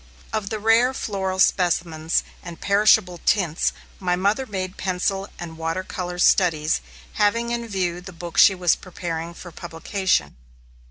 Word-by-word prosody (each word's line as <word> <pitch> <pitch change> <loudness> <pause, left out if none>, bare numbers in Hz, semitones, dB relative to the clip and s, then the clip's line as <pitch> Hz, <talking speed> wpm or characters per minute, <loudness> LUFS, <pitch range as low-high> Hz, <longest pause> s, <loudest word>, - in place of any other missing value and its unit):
Of 215 -2 -2
the 220 - -2
rare 225 +4 +3
floral 190 -5 -2
specimens 170 -4 +2 0.2
and 170 -2 -9
perishable 200 -3 +3
tints, 175 -6 +2 0.3
my 180 -2 +1
mother 205 +8 0
made 185 -2 -4
pencil 195 +1 -1
and 165 -2 -8
water 165 +3 -2
color 180 -1 -5
studies, 165 -4 +3 0.4
having 230 +3 +2
in 235 -1 -2
view 180 -4 -2
the 190 +1 -9
book 170 -1 -4
she 195 - +7
was 180 -2 +3
preparing 170 -2 -6
for 175 - -10
publication. 170 - -1
185 Hz, 145 wpm, -23 LUFS, 170-200 Hz, 0.4 s, she